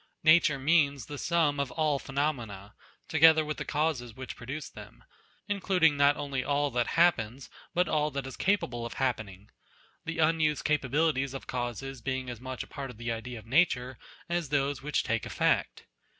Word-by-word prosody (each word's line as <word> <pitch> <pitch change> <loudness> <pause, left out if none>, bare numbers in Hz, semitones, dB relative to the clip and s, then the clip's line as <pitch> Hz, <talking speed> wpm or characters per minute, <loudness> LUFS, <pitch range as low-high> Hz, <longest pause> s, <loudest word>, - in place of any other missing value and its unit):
Nature 155 -2 +5
means 140 -3 +2
the 145 0 -7
sum 160 -4 +1
of 140 -2 -1
all 155 -3 +1
phenomena, 120 -9 -3 0.3
together 160 -1 +6
with 150 0 -4
the - - -3
causes 145 -7 -1
which 130 0 -7
produce 135 +5 -6
them; - - -13 0.4
in 205 -1 -2
cluding 180 -5 +4
not 145 0 +4
only 140 -2 -2
all 145 0 0
that 120 -1 0
happens, 135 -7 +2 0.2
but 180 0 +3
all 150 -1 +1
that 140 -2 -4
is 135 - -7
capable 125 -12 0
of 115 - -6
happening; 110 -6 -3 0.5
the 165 0 -4
unused 155 -2 +2
capabilities 140 -1 +1
of 135 - -7
causes 125 +1 -4
being 130 0 -3
as 120 -1 -9
much 130 0 -5
a - - -14
part 140 -2 -6
of 125 - -11
the 120 0 -3
idea 115 +2 -5
of 110 - -11
Nature, 130 -2 +1 0.3
as 170 -4 -2
those 140 -1 0
which 150 +1 0
take 115 -1 -1
effect. - - 0
140 Hz, 180 wpm, -29 LUFS, 125-155 Hz, 0.5 s, together